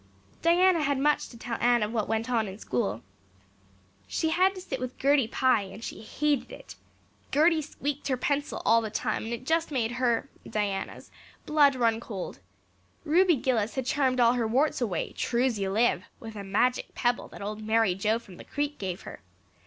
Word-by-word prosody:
Diana 345 +1 +4
had 285 -2 +1
much 295 +2 +1
to 235 - -12
tell 230 0 -5
Anne 240 -2 +4
of 210 +2 -3
what 220 -3 0
went 225 +1 0
on 230 -4 +1
in 190 0 -7
school. 120 - -2 1.0
She 320 - 0
had 370 +4 +3
to 370 - -7
sit 265 -7 -5
with 255 0 -5
Gertie 275 -3 +3
Pye 255 -1 +2
and 200 +3 -9
she - - -6
hated 290 +5 -1
it; - - -10 0.6
Gertie 315 +3 +4
squeaked 290 -1 -4
her 260 -2 0
pencil 285 +3 -1
all 230 0 +5
the 220 - -4
time 220 +1 -2
and 225 - -5
it 235 +1 -5
just 325 +3 +1
made 245 -6 -1
her 245 0 0 0.2
Diana's 205 -3 -3 0.3
blood 290 -3 +4
run 230 -3 +2
cold; 200 - -6 0.7
Ruby 350 +2 +4
Gillis 235 -5 0
had 265 -2 -2
charmed 260 -1 +1
all 235 0 +5
her 240 -3 0
warts 265 +5 +1
away, 190 -9 -1
true's 240 -2 0
you 195 -1 -1
live, 205 -3 +2
with 225 -1 -9
a 200 - -6
magic 230 +6 0
pebble 245 0 0
that - - -10
old 210 +1 -5
Mary 220 -2 +2
Joe 210 +4 +1
from 195 -6 -13
the - - -10
Creek 290 +1 -3
gave 185 -2 -4
her. - - -10
240 Hz, 190 wpm, -28 LUFS, 220-285 Hz, 1.0 s, all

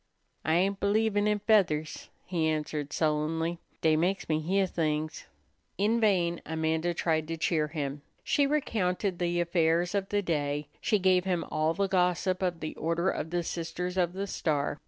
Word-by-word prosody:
"I 160 - +2
ain't 195 +3 +1
believin' 205 0 +2
in 210 0 +2
feathers," 190 -8 +1 0.2
he 165 -4 0
answered 150 -2 -2
sullenly; 160 +2 0 0.2
"dey 160 -1 +4
meks 180 +5 0
me 155 -1 +1
heah 190 +5 +1
things." 155 -3 -2 0.5
In 215 +4 +2
vain 180 -6 +2
Amanda 160 +2 -1
tried 160 -2 0
to 165 0 -3
cheer 155 -1 +1
him; 145 -2 -4 0.2
she 285 -1 +2
recounted 200 -10 0
the 175 0 0
affairs 170 0 +2
of 195 -1 -1
the 205 0 0
day; 145 -3 -1
she 210 - +2
gave 185 -1 +3
him 180 -3 0
all 155 +1 +1
the 200 0 +1
gossip 185 0 +1
of 175 -3 -1
the 155 - -4
Order 170 +3 0
of 160 - -4
the 175 0 -1
Sisters 175 +2 -4
of 175 -2 +1
the 195 +1 -3
Star. 145 -6 -1
170 Hz, 170 wpm, -29 LUFS, 160-190 Hz, 0.5 s, dey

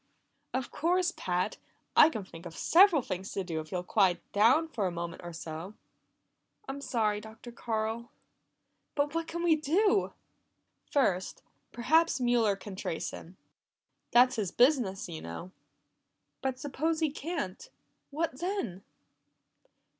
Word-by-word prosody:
"Of 260 -1 -3
course, 355 +3 +1
Pat! 180 0 -1 0.4
I 305 - +8
can 220 -10 -5
think 170 -2 -10
of 165 - -11
several 345 -5 +6
things 190 -1 -5
to 195 - -2
do 165 -3 -3
if 155 0 -8
you'll 180 -1 -2
quiet 185 -2 +3
down 235 +11 +4
for 220 -11 -1
a - - -2
moment 170 0 -5
or 175 - -6
so." 165 +4 -7 0.9
"I'm 280 +1 -5
sorry, 215 -6 0
Dr. 220 +2 -11
Carl 225 0 -3 0.9
but 290 0 0
what 330 0 -2
can 340 +1 -4
we 335 -2 +5
do?" 390 +8 +2 0.8
"First, 190 -10 0 0.3
perhaps 310 +6 +3
Mueller 240 -4 +3
can 195 0 -9
trace 165 -3 -3
him. 180 +3 -11 0.7
That's 250 +1 +5
his 205 -4 0
business, 240 - +2
you 165 -2 -7
know." 85 - -7 0.9
"But 265 -1 -1
suppose 300 +4 -1
he 315 -3 +1
can't 305 - -5 0.4
what 300 -2 -2
then?" 345 - -3
235 Hz, 140 wpm, -30 LUFS, 185-310 Hz, 0.9 s, I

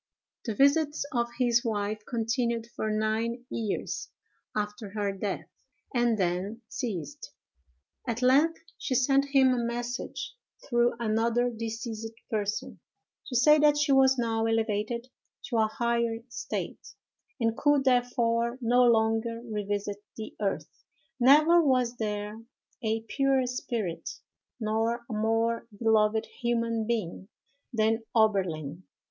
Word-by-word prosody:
The 225 -4 -2
visits 290 +4 +3
of 235 -1 +1
his 240 -2 +3
wife 215 -1 -2
continued 230 0 -1
for 215 - -2
nine 220 +3 -1
years 220 -4 -3 0.5
after 210 0 -3
her 205 -2 0
death, 195 0 -3 0.5
and 240 -2 +2
then 190 +5 -1
ceased. 185 - -5 0.8
At 235 +1 -2
length 290 +6 +4 0.2
she 260 - -1
sent 275 +2 +3
him 270 -2 +4
a 240 -1 0
message, 240 - -4 0.3
through 240 -2 +2
another 235 +2 +1
deceased 225 0 -5 0.2
person, 210 -1 -2 0.5
to 255 - -5
say 300 +5 +6
that 295 0 +5
she 295 -1 +2
was 265 -1 +5
now 225 -2 0
elevated 225 +2 -1 0.4
to 235 - 0
a 220 -1 +4
higher 235 0 -1
state, - - -5 0.4
and 225 -1 +1
could 290 0 +3
therefore 240 -2 +2
no 245 0 +3
longer 225 0 +2
revisit 205 -2 -3
the 220 - -7
earth. 195 -2 -3 0.4
Never 305 +7 +6
was 250 -4 +2
there 210 0 -3 0.4
a 220 -1 0
purer 270 +3 +1
spirit, 235 -7 -3 0.5
nor 225 +2 -1
a 230 - -6
more 225 +2 0
beloved 220 0 +3 0.2
human 230 -2 0
being, 200 -5 -2 0.4
than 225 -1 +1
Oberlin. 185 -8 +1
230 Hz, 120 wpm, -28 LUFS, 215-245 Hz, 0.8 s, say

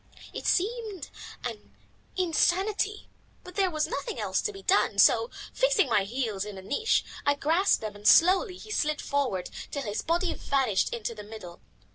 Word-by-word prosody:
It - - -5
seemed 415 - -1 0.3
an 225 -4 -7 0.4
insanity, 380 +4 +1 0.4
but 360 - -11
there 385 -1 +2
was 310 -3 0
nothing 465 - -4
else - - 0
to 425 - -2
be 390 -1 -11
done, 390 - +2
so, 465 - +5 0.2
fixing - - +2
my 205 -4 +2
heels 220 -3 -2
in 210 -1 -7
a 190 - -9
niche, 285 - +1 0.2
I 285 - +3
grasped 325 +7 +2
them 215 -2 -5
and 205 0 -4
slowly 370 +3 +5
he 435 - -11
slid 305 -7 0
forward 255 -11 -2 0.2
till 280 - -4
his 210 -1 -3
body 345 +2 0
vanished 265 -8 0
to 235 0 -3
the 215 - -9
middle. 205 -5 -10
305 Hz, 170 wpm, -28 LUFS, -, 0.4 s, so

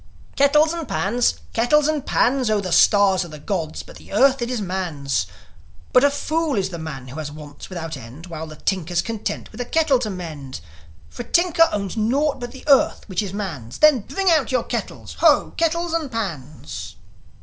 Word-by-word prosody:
"Kettles 300 +3 +4
and 335 -3 -5
pans! 240 +5 +1 0.2
Kettles 285 +6 +3
and 305 -3 0
pans! 255 -1 +2
Oh, 215 -1 +2
the 185 -3 -4
stars 190 +1 +5
are - - -8
the 155 -2 -10
gods'; 160 0 -3
but - - -13
the - - -15
earth, 265 +5 +4
it 240 - -1
is 250 -2 -2
man's. 160 - -2 0.7
But 250 - +6
a 285 - +6
fool 310 +1 -1
is 190 -2 0
the 170 -3 -7
man 135 -5 -7
who 140 +5 -7
has 150 -2 -5
wants 150 -1 -11
without 165 -3 -5
end, 125 +9 -11
While 160 -2 -7
the 155 - -10
tinker's 175 0 -1
content 225 -2 -4
with - - -7
a - - -3
kettle 310 -2 +2
to 230 -4 -2
mend. 155 -8 -7 0.5
For - - -8
a - - -7
tinker 340 +1 +3
owns 200 -1 -3
naught 270 +7 +1
but 245 -1 -6
the 265 - -13
earth, 275 -2 +4
which 190 -2 -1
is 200 -3 -4
man's. 165 - -5
Then, 305 -4 +6
bring 385 - 0
out 300 -7 +2
your 250 -2 +1
kettles! - - -5
Ho, - - +4
kettles 335 +1 0
and 315 -5 -1
pans!" 160 - -5
210 Hz, 200 wpm, -22 LUFS, -, 0.7 s, But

